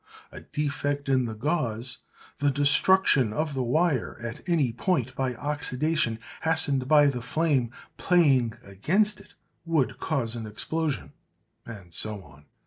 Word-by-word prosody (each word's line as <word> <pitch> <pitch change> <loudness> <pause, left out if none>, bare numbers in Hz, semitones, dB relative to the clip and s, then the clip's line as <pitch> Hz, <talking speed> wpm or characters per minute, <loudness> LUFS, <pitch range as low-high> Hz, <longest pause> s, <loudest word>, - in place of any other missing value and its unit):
A - - -9
defect 145 -1 -3
in 130 -2 +2
the 110 -1 -5
gauze, 120 -3 -2 0.4
the 145 - +2
destruction 145 - +3
of 155 +5 -2
the 135 - -2
wire 140 +1 0
at 120 -1 -6
any 155 -8 +2
point 130 - -1
by 130 -2 -2
oxidation 145 -2 -1 0.2
hastened 145 -5 +2
by 150 0 +6
the 130 -4 0
flame 140 -3 0 0.3
playing 140 - +3
against 185 - 0
it, - - -20 0.3
would 160 -6 0
cause 125 -7 -1
explosion;' 120 - -2 0.5
and 100 -7 -10
so 105 +2 -2
on. 75 -1 -18
135 Hz, 135 wpm, -26 LUFS, 115-155 Hz, 0.5 s, by